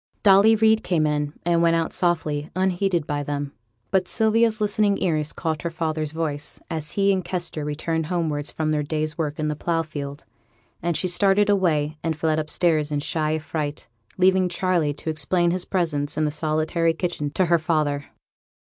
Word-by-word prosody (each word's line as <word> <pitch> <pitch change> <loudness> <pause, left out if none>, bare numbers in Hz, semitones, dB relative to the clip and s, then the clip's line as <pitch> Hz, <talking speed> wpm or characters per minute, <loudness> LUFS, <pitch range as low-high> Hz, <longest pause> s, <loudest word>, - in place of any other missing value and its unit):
Dolly 200 +2 +6
Reid 220 0 +3
came 165 -4 +1
in, 150 -1 -1
and 170 -1 +3
went 165 0 +4
out 165 -1 -1
softly, 155 -4 0
unheeded 185 -3 +1
by 145 0 -2
them. 145 0 -3 0.4
But 185 -2 +2
Sylvia's 220 0 +2
listening 210 -1 +2
ears 155 -4 0
caught 160 -3 -3
her 170 - -2
father's 155 -2 -2
voice, 150 -2 -4
as 155 -2 -3
he 200 0 +3
and 185 -1 -1
Kester 170 -4 -3
returned 155 +2 -2
homewards 155 -4 -2
from 155 -1 -2
their 150 -1 +1
day's 155 +1 -2
work 150 -3 -3
in 155 - -1
the 150 - -1
plough 165 +2 -1
field; 145 -2 -7 0.6
and 170 -1 0
she 185 - 0
started 200 +3 +3
away, 155 -6 +1
and 160 -2 -1
fled 155 -1 +1
upstairs 155 -1 +1
in 145 -1 -1
shy 155 +1 0
affright, 155 -1 -4 0.3
leaving 185 0 +4
Charley 175 -4 +1
to 160 - -3
explain 170 +3 +1
his 180 0 -2
presence 150 -6 -1
in 155 - +2
the 150 - 0
solitary 155 +2 0
kitchen 165 -4 -2
to 185 - +2
her 170 -1 +3
father. 155 -3 0
160 Hz, 180 wpm, -23 LUFS, 150-180 Hz, 0.6 s, Dolly